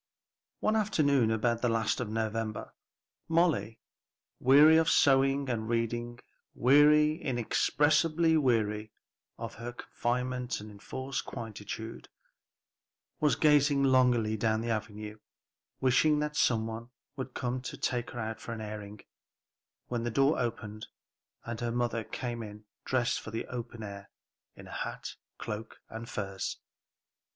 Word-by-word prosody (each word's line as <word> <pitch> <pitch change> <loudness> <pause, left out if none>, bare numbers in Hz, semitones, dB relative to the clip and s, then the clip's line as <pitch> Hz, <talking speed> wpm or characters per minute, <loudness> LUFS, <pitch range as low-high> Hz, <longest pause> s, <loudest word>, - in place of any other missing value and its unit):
One 215 - +2
afternoon 145 - +3
about 115 +1 +1
the 125 - +2
last 115 0 +1
of 125 -4 -3
November, 110 0 -3 0.6
Molly, 165 -9 +2 0.6
weary 150 +5 +7
of 160 0 +3
sewing 135 0 +4
and 115 -3 -2
reading, 120 +1 -1 0.4
weary 150 +4 +5
inexpressibly 155 +6 +2
weary, 110 -6 +1 0.4
of - - -6
her 120 +1 -5
confinement 125 +1 -2
and 105 +1 -9
enforced 130 +6 -5
quietude, 110 -1 -7 1.1
was 150 -1 +3
gazing 145 -2 +4
longingly 125 -5 +3
down 110 0 +1
the 115 0 -2
avenue, 105 0 -4 0.6
wishing 135 +4 +4
that 150 0 -2
some 115 -6 +2
one 115 +1 -6 0.3
would 130 -2 -6
come 125 0 -2
to 125 - -6
take 120 -1 -1
her 120 - -7
out 110 0 -4
for 115 - -5
an 115 - -6
airing, 105 -1 -7 0.8
when 120 -2 -3
the 120 - -1
door 135 +6 +3
opened 110 -3 -4 0.6
and 115 -1 -5
her 120 -1 -1
mother 120 -1 -1
came 120 +1 -5
in 105 -1 -9 0.2
dressed 125 -2 +1
for - - -8
the 115 +1 -4
open 120 -2 -6
air, 100 -1 -8 0.5
in - - -12
hat, - - -5 0.2
cloak 110 +1 -6
and 115 +1 -7
furs. 95 -2 -4
120 Hz, 130 wpm, -30 LUFS, 110-135 Hz, 1.1 s, weary